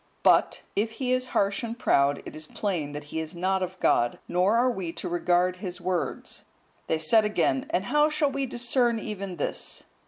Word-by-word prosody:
But, - - +4
if 220 +2 0
he 250 +2 -2
is 255 0 0
harsh 200 -4 +1
and 230 -1 -5
proud, 140 -9 +2
it - - -8
is 155 0 -6
plain 170 -8 -2
that 145 0 -5
he 160 - -1
is 160 +2 -5
not 190 +2 0
of 185 0 -4
God, 120 0 +2
nor 185 +5 +2
are 250 +2 +3
we 190 -7 -4
to 165 - -5
regard 175 +1 +1
his 180 -1 -6
words." 180 0 -3 0.4
They 160 - +1
said 185 +8 +4
again, 255 +6 +1
"And 180 - 0
how 295 +5 +3
shall 300 -2 +1
we 275 0 -2
discern 240 -1 +1
even 200 -4 -5
this?" - - -4
195 Hz, 195 wpm, -27 LUFS, 175-240 Hz, 0.4 s, But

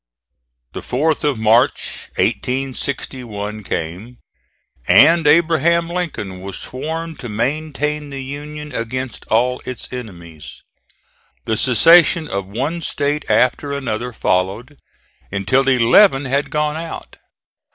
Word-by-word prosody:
The - - -6
4th 155 +5 0
of 145 -4 +1
March, 115 +5 +1
1861, 125 -5 -3
came, 95 +6 -5 0.7
and 165 -1 +6
Abraham 170 +2 +3
Lincoln 125 - -4
was 95 0 -6
sworn 160 +5 -5
to 125 - -7
maintain 150 +5 -2
the 135 -1 -6
Union 150 +2 -7
against 125 +1 -5
all 125 +3 +1
its 125 - -7
enemies. 85 -10 -9 0.8
The 110 - 0
secession 160 +8 +5
of 100 -5 -4
one 135 - -3
State 145 -1 -2
after 140 +3 +2
another 125 -3 -3
followed, 105 +7 -1 0.5
until 130 +8 +1
eleven 135 - +5
had 140 +2 -1
gone 150 0 -1
out. 165 0 -8
130 Hz, 110 wpm, -19 LUFS, 110-150 Hz, 0.8 s, and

